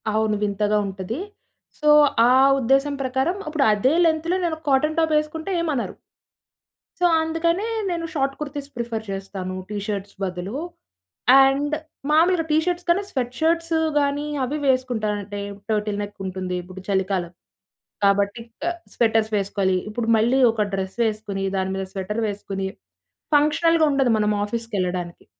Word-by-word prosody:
అవును. 215 0 +1
వింతగా 210 +1 +1
ఉంటది. 195 +4 -5 0.6
సో, 300 - +2 0.4
ఆ - - +5 0.3
ఉద్దేశం 270 +3 +2
ప్రకారం, 265 +7 0
ఇప్పుడు 305 -3 +1
అదే 230 +7 +2
లెంత్‌లో 325 +2 +1
నేను 335 -2 0
ఒక 315 - -21
కాటన్ 305 +4 +2
టాపేసుకుంటే 315 +2 0
ఏమనరు. 300 -7 -2 1.1
సో, - - +5 0.2
అందుకనే 335 +5 0 0.2
నేను 340 -2 -2
షార్ట్ 275 -3 0
కుర్తీస్ 285 -1 -5
ప్రిఫర్ 235 -2 -3
చేస్తాను. 195 -1 -5 0.2
టీ 210 - -4
షర్ట్స్ 200 -2 -4
బదులు. 185 +5 -4 0.9
అండ్, 280 +2 +1 0.4
మామూలుగా 330 +2 +4
టీ 305 - +4
షర్ట్స్ 355 0 -2
కన్న 345 +3 +4
స్వెట్ 245 -2 -2
షర్ట్స్ 330 +1 +1 0.3
గానీ, 285 +1 0 0.2
అవి 275 +4 -2
వేసుకుంటానంటే, 215 -6 -1 0.3
టర్టిల్ 210 -1 0
నెక్కుంటుంది. 185 -2 -5
ఇప్పుడు 185 +1 -10
చలికాలం 190 -3 0 0.7
కాబట్టి, 200 +3 +2 0.2
క - - -1 0.3
స్వెటర్స్ 225 -2 +2
వేసుకోవాలి. 195 -1 0
ఇప్పుడు 225 +1 -3
మళ్ళీ 240 +5 +3
ఒక 220 -1 0
డ్రెస్ 190 +1 -3
వేసుకొని, 210 -3 -3
దాని 190 0 -1
మీద 190 0 -3
స్వెటర్ 205 +3 -3
వేసుకొని, 195 -1 -4 0.7
ఫంక్షనల్‌‌గా 320 +2 +4
ఉండదు 270 -3 +2
మనం 210 0 +2
ఆఫీస్‌కెళ్ళడానికి. 185 -6 -3
230 Hz, 130 wpm, -23 LUFS, 200-300 Hz, 1.1 s, ఆ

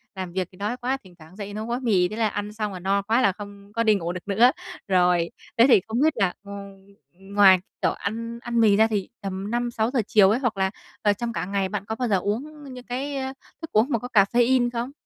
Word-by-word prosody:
làm 185 -2 -6
việc 185 -2 -1
thì 185 - -18
đói 210 +5 -2
quá, 255 +2 -1
thỉnh 185 -2 -16
thoảng 160 +4 -15
dậy 205 -1 -7
nấu 215 +1 -4
gói 240 +2 -2
mì. 195 -8 +2
Thế 215 - -6
là 225 -1 +1
ăn 205 0 -4
xong 210 -2 -3
là 180 - -6
no 195 +2 +1
quá 225 +5 +1
là 200 - +4
không 200 0 -11
có 230 0 +1
đi 215 -2 +4
ngủ 170 -2 -2
được 180 +2 -8
nữa. 230 +6 +5 0.4
Rồi, 180 -2 +2 0.3
thế 230 - +7
thì 220 -8 +6
không 230 +4 -1
biết 315 0 +4
là, 195 -5 +1
ừm, 200 -1 -10 0.3
ừm, 195 +1 -13
ngoài 190 -3 +7 0.2
kiểu - - +2
ăn 230 +3 -5
ăn 235 -1 -1
mì 210 -3 +5
ra 220 +1 +5
thì 205 -4 -2
tầm 195 +2 -4
5-6 240 -1 -1
giờ 250 -4 +1
chiều 200 -3 +5
ấy 225 +5 +2
hoặc 240 -6 -1
là, 190 0 +1 0.3
ờ, 205 -1 +3
trong 235 +3 -4
cả 170 - -2
ngày 195 -1 -1
bạn 200 -1 -4
có 220 - -3
bao 245 +1 -2
giờ 200 -3 +3
uống 275 - -4
những 250 0 -10
cái, 275 +3 -3
a, 265 0 -3 0.3
thức 325 - -7
uống 220 +4 +3
mà 235 -5 +1
có 245 - -6
caffeine 240 +4 +4
không? 240 +3 -3
210 Hz, 260 wpm, -24 LUFS, 195-240 Hz, 0.4 s, thế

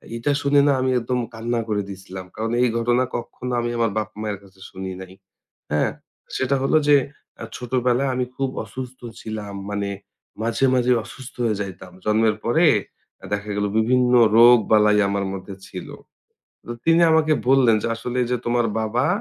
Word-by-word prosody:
এইটা 115 +5 0
শুনে 140 0 +4
না 140 - +4
আমি 130 - +1
একদম 125 +1 -2
কান্না 115 +1 -2
করে 105 -2 0
দিছিলাম। 95 -1 -8
কারণ 115 +1 -3
এই 125 - +4
ঘটনা 120 +2 +2
কখনো 125 +1 -5
আমি 120 - -1
আমার 115 -2 +1
বাপ 110 0 -1
মায়ের 105 -2 -3
কাছে 95 -1 -20
শুনি 95 0 -6
নাই। 95 0 -10 0.6
হ্যাঁ? 75 0 +1 0.5
সেটা 130 +1 +1
হলো 135 - +2
যে 145 - +7 0.5
আ - - -4
ছোটবেলায় 125 +1 0
আমি 125 0 0
খুব 135 -1 -1 0.2
অসুস্থ 130 0 -8 0.2
ছিলাম। 105 -2 -6 0.2
মানে 100 -1 -2 0.5
মাঝে, 115 +3 0
মাঝেই 125 0 +3
অসুস্থ 130 +4 -11
হয়ে 110 -3 0
যাইতাম। 95 -2 -7
জন্মের 110 0 +2
পরে 160 +9 +3 0.7
দেখা 105 +1 -2
গেল 105 - 0
বিভিন্ন 125 +2 +2 0.2
রোগ-বালাই 110 -3 +6
আমার 100 0 -1
মধ্যে 95 +1 -7
ছিল। 90 - -8 0.8
তো - - -8
তিনি 165 +1 +4
আমাকে 160 -1 +3 0.2
বললেন 130 -4 +5
যে, - - -1
"আসলে 120 +2 -4
যে 125 - +2
তোমার 120 0 +2
বাবা 110 +3 0
115 Hz, 165 wpm, -22 LUFS, 105-125 Hz, 0.8 s, যে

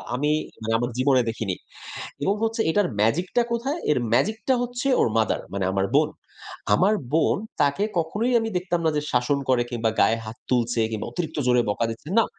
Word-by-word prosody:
আমি 145 +4 +1 0.3
মানে 110 0 -2
আমার 120 +1 -1
জীবনে 130 0 +4
দেখিনি। 110 -4 -3 0.7
এবং 195 +7 +2
হচ্ছে 225 +1 0
এটার 205 +1 +2
ম্যাজিক 130 - +2
টা 240 - +6
কোথায়? 270 +7 -1
এর 150 - +3
ম্যাজিকটা 220 - +2
হচ্ছে 245 +2 -2
ওর - - +4
মাদার, 110 - +1
মানে 100 -1 -1
আমার 95 0 +1
বোন। - - +4 0.7
আমার 195 - +4 0.2
বোন 160 +1 +3 0.3
তাকে 145 +8 +2
কখনোই 210 +10 0
আমি 225 - -2
দেখতাম 175 -1 -2
না - - +4
যে, 150 - 0
শাসন 125 +3 +2
করে 125 -2 +3
কিংবা 115 -2 0
গায়ে 115 - +4
হাত 110 +1 -8
তুলছে 120 -2 +1
কিংবা 110 -2 -4
অতিরিক্ত 160 -3 -4
জোরে 125 -1 +4
বকা 110 +3 0
দিচ্ছে, 115 +6 -8
না। 225 - +6
145 Hz, 190 wpm, -24 LUFS, -, 0.7 s, টা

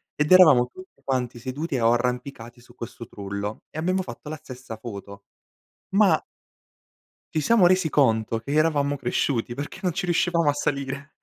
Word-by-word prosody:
ed 150 0 -1
eravamo 155 -10 +7
tutti 185 -4 -15
quanti 125 -3 -2
seduti 135 +3 -3
o 115 0 +3
arrampicati 125 0 -3
su 120 0 -19
questo 115 -1 -8
trullo, 100 +1 -6
e 155 - -8
abbiamo 185 +3 0
fatto 155 - -9
la 155 - -5
stessa 130 -6 -10
foto. 100 -3 -9 0.7
Ma 195 -5 +3 1.1
ci 155 - +2
siamo 205 +3 +4
resi 185 -2 +3
conto 115 -5 +2
che 140 +5 -6
eravamo 145 -2 +2
cresciuti 120 -1 -1
perché 145 +7 -7
non 180 -2 0
ci 180 +1 -3
riuscivamo 170 -2 +2
a - - +4
salire. 140 0 -3
140 Hz, 160 wpm, -24 LUFS, 120-160 Hz, 1.1 s, eravamo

